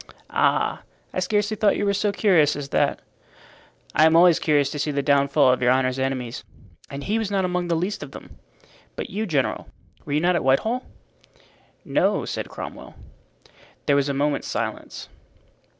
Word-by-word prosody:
"Ah! - - +1 0.3
I - - -1
scarcely 205 +3 0
thought 210 -1 +2
you 205 - -1
were 200 - +2
so 205 +1 0
curious 180 -6 +3
as 140 -1 -6
that." - - 0 0.9
"I 155 +2 +5
am 160 - +3
always 170 -1 +6
curious 145 -3 +2
to 150 - -5
see 150 - -1
the 140 -1 -1
downfall 140 -1 +3
of 130 - -3
your 125 - +3
honor's 130 0 +1
enemies, 130 -2 -3 0.5
and 140 0 -6
he 215 +3 0
was 220 -3 -2
not 195 -2 0
among 180 -1 -1
the 170 - +1
least 185 +5 -2
of - - -7
them. - - -13 0.6
But - - -6
you, 215 +3 -2
general, 145 -7 -1 0.4
were 145 - -5
you 150 - +3
not 175 +2 +2
at 170 - 0
Whitehall?" 220 - +1 1.0
"No," - - +1
said - - -4
Cromwell. - - -9 0.9
There 145 - +3
was 140 0 +1
a 140 - -1
moment's 145 +1 -1
silence. - - -5
155 Hz, 180 wpm, -23 LUFS, 140-195 Hz, 1.0 s, always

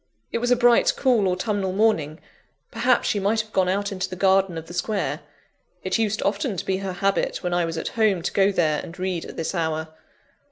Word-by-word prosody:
It - - -1
was 245 +1 -1
a 250 - +5
bright, 240 -1 +4
cool, 240 -7 +3
autumnal 190 +1 -1
morning; 185 -7 +1 0.5
perhaps - - +2
she 205 - +1
might 210 +3 +1
have 215 -1 -16
gone 185 -1 +2
out 200 +2 -1
into 185 -1 -3
the 185 - -6
garden 190 -1 +2
of 160 - -6
the 175 - -11
square: 200 +3 -2 0.6
it - - 0
used 215 -1 0
often 200 +1 -1
to - - -4
be 190 - 0
her 190 -1 -4
habit, 195 +2 -1
when 180 -1 -1
I 175 -1 +2
was 165 0 -4
at 160 - -3
home, 210 -6 +1
to - - -2
go 195 0 +3
there 155 -5 +1
and 165 - -10
read 185 -2 -3
at - - -10
this 165 - -2
hour. 160 -2 -2
190 Hz, 220 wpm, -23 LUFS, 175-210 Hz, 0.6 s, a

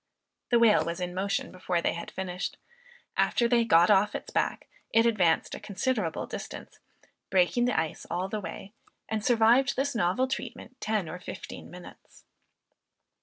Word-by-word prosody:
The 240 - +5
whale 230 -3 +5
was 170 +2 -4
in 180 -1 -3
motion 195 +2 -1
before 180 -1 -1
they - - 0
had 170 - -6
finished. 180 -1 -4 0.6
After 235 - +3
they 235 -1 +3
got 175 -3 +5
off 205 +1 +3
its - - -6
back, - - -1 0.2
it 225 +1 +4
advanced 185 -8 +2
a - - -5
considerable 210 -3 -2
distance, - - -8 0.5
breaking 190 +6 +3
the 245 - +2
ice 160 -1 -4
all 180 +2 -1
the 210 +2 -4
way, 195 +3 -8 0.3
and 220 -1 -2
survived 240 +4 +4
this 280 +2 0
novel 210 +4 +1
treatment 260 0 -6
ten 215 -5 0
or 170 +3 -6
fifteen 180 - -8
minutes. - - -14
205 Hz, 160 wpm, -28 LUFS, 180-235 Hz, 0.6 s, The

